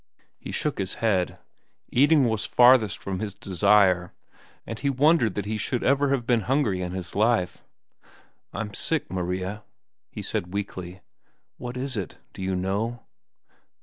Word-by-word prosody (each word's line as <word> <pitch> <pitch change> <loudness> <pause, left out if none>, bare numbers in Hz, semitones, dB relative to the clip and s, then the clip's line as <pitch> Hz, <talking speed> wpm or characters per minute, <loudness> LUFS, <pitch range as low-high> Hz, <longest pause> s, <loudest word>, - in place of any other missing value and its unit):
He - - -7
shook - - -2
his 95 -1 -2
head. 100 -6 0 0.5
Eating 145 +2 +4
was 110 -3 0
farthest 120 -4 +5
from 95 -2 -5
his 100 -2 -4
desire, 95 -1 +3 0.5
and 115 - -6
he 140 - 0
wondered 140 - +3
that 105 - -2
he 110 +1 -3
should 120 +3 -1
ever 140 +1 +3
have 135 -4 0
been 120 -1 +3
hungry 120 -10 +1
in 90 -1 -3
his 90 -2 -5
life. 110 -3 +1 0.9
"I'm 105 -2 -5
sick, 155 - -1
Maria," 95 +3 -3 0.5
he - - -7
said 90 +1 -3
weakly. 95 -2 -5 0.6
"What 125 0 -6
is 135 +1 -2
it? 95 -5 -5 0.2
Do - - -9
you 95 0 -1
know?" 105 +6 -2
105 Hz, 150 wpm, -25 LUFS, 95-125 Hz, 0.9 s, farthest